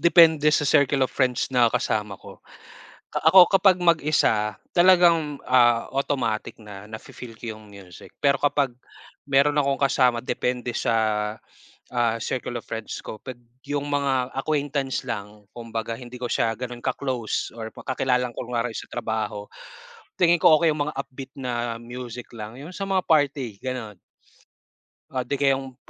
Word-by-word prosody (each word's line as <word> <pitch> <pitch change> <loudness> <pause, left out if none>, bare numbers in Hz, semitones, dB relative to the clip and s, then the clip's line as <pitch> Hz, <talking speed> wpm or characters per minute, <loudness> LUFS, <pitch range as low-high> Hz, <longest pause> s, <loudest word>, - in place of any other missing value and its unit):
depende 160 -3 +6
sa 145 -2 +2
circle 140 -1 +3
of - - -5
friends 125 -3 0
na 120 -3 +3
kasama 105 -2 -1
ko. - - -13 0.8
Ako 175 +3 +7
kapag 190 -2 +4
mag-isa, 145 - +2 0.2
talagang, 175 -5 +4
ah, 120 -2 +4
automatic 125 -6 -1
na 105 -2 -10
nafe-feel 110 +2 -10
ko 110 -2 -6
yung 110 - -15
music. 95 -3 -13
Pero 140 -1 +3
kapag 140 -2 +1 0.5
meron 140 +1 +3
akong 140 -1 +1
kasama 125 -3 +3
depende 125 -1 -2
sa, - - 0 1.0
ah, 120 -2 +1
circle 120 0 -3
of - - -27
friends 110 -1 -5
ko, 110 - -8
pag 130 -2 -8 0.3
yung 145 0 -3
mga 135 -3 0
acquaintance 140 -2 -1
lang, 105 -1 -6
kumbaga 115 -1 -4
hindi 125 0 -10
ko 120 - -3
siya 115 -1 +1
ganon 120 -1 -6
ka-close 125 -5 -2
or 110 -1 -7
kakilala 125 -1 -1
lang 120 - -15
kunyari 120 -1 -3
sa - - -7
trabaho, 110 -3 -3 0.7
tingin 175 -1 +4
ko 155 - +7
okey 165 -2 +4
yung 145 -1 -2
mga 150 - -6
upbeat 135 -1 -7
na 120 -3 -3
music 120 0 -8
lang. 110 +2 -8
Yun 160 +5 -9
sa 195 - -6
mga 190 -1 +1
party 140 -8 +1
ganon, 125 -6 -5 1.2
ah, 130 - 0
'di 140 +3 -2
kayong 135 -2 0
125 Hz, 150 wpm, -24 LUFS, 115-145 Hz, 1.2 s, Ako